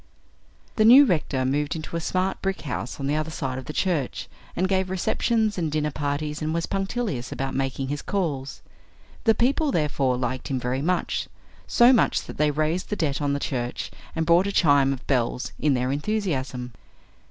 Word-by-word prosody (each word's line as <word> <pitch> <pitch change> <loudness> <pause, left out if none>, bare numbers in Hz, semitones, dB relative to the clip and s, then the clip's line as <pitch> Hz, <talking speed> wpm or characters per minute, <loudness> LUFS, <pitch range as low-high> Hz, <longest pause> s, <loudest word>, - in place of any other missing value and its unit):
The 215 - +5
new 255 +6 +9
rector 150 - 0
moved 145 +3 0
into 160 +1 -6
a 170 - -1
smart 185 +3 -1
brick 195 0 -2
house 135 -4 -5
on 135 - -3
the 145 +2 +1
other 155 +1 -1
side 135 -5 -3
of 130 - -9
the - - -5
church, 155 -6 -1 0.3
and 185 +2 +1
gave 190 -1 0
receptions 215 +3 0
and 160 -3 -1
dinner 150 0 0
parties, 150 +1 -3
and 155 +1 -1
was 170 - 0
punctilious 195 - -2
about 135 0 -3
making 135 0 -2
his 145 +1 -3
calls. 145 -9 -3 0.6
The 225 -1 +5
people 280 +5 +2
therefore 140 - +1
liked 130 0 -3
him 135 -2 -1
very 125 +2 -2
much 180 +4 -1 0.4
so 240 +2 +6
much 240 - +2
that - - -10
they 150 0 +4
raised 155 +5 -1
the 210 - -1
debt 150 -6 -1
on 145 -1 +1
the 140 - -1
church 125 -4 -3 0.2
and 160 0 0
bought 170 +3 +4
a - - -1
chime 145 -7 +4
of 135 -1 -5
bells, 125 -2 0
in 145 -2 +2
their 125 +1 0
enthusiasm. 140 - -2
150 Hz, 190 wpm, -25 LUFS, 135-185 Hz, 0.6 s, new